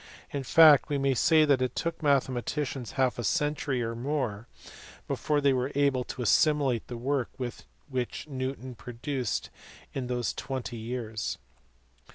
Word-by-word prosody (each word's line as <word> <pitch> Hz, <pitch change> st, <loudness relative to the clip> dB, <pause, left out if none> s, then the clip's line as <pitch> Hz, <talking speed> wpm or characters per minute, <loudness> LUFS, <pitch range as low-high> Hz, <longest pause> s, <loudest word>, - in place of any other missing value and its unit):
In 140 Hz, -, -2 dB
fact 150 Hz, +2 st, +7 dB
we 145 Hz, -, +1 dB
may 135 Hz, -1 st, +2 dB
say 155 Hz, +5 st, +5 dB
that 140 Hz, -3 st, +3 dB
it 130 Hz, -, -1 dB
took 170 Hz, 0 st, -2 dB
mathematicians 135 Hz, -3 st, 0 dB
half 130 Hz, -2 st, +1 dB
a -, -, -2 dB
century 145 Hz, 0 st, 0 dB
or 115 Hz, 0 st, -2 dB
more 120 Hz, -3 st, -2 dB, 0.6 s
before 150 Hz, -1 st, 0 dB
they 140 Hz, -1 st, +4 dB
were 130 Hz, +2 st, -1 dB
able 140 Hz, -3 st, +2 dB
to 125 Hz, -, -5 dB
assimilate 140 Hz, -2 st, +3 dB
the 120 Hz, -, -6 dB
work 130 Hz, +1 st, -1 dB
which 125 Hz, +1 st, -5 dB
Newton 130 Hz, -2 st, -4 dB
had 125 Hz, -, -10 dB
produced 125 Hz, 0 st, -3 dB, 0.4 s
in 130 Hz, -2 st, -3 dB
those 120 Hz, -3 st, -1 dB
twenty 130 Hz, -3 st, -5 dB
years. 110 Hz, -2 st, -4 dB
130 Hz, 150 wpm, -28 LUFS, 120-145 Hz, 0.6 s, fact